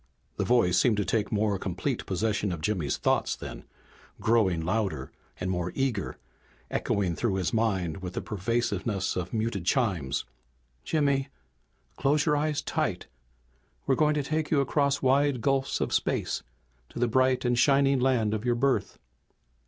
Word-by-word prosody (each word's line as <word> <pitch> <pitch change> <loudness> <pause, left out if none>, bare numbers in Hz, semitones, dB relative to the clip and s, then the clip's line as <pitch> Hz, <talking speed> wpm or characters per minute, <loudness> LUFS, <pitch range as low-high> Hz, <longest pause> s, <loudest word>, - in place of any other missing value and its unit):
The - - +1
voice 115 -8 +3
seemed 115 -5 +3
to 105 - 0
take 105 +3 0
more 105 -2 +1
complete 95 +9 -3
possession 100 +1 0
of 85 -3 -4
Jimmy's 85 -8 -1
thoughts - - +1
then, - - -8 0.5
growing 105 -7 +2
louder 105 +2 -1 0.3
and 90 0 -2
more 90 -1 -2
eager, 125 -9 -1 0.5
echoing 95 -4 0
through 110 -1 0
his 90 -4 -1
mind 95 -8 0
with 95 -1 -7
the - - -2
persuasiveness 105 -2 -1
of 90 -1 -3
muted 110 -4 -1
chimes. 90 - 0 0.6
"Jimmy, 140 -3 +1 0.7
close 140 +1 +2
your 150 -2 +3
eyes 150 0 0
tight. - - -1 0.8
We're - - +3
going 150 +2 +3
to 145 - 0
take 155 +2 -1
you 150 - +3
across 140 0 +1
wide 135 0 +3
gulfs 135 +3 0
of - - -1
space - - 0 0.5
to - - -11
the 120 0 +2
bright 130 +2 +2
and 120 0 +2
shining 135 +1 +4
land 125 -5 +2
of 110 -1 -2
your 120 -1 +1
birth." 135 +2 0
115 Hz, 155 wpm, -28 LUFS, 95-135 Hz, 0.8 s, shining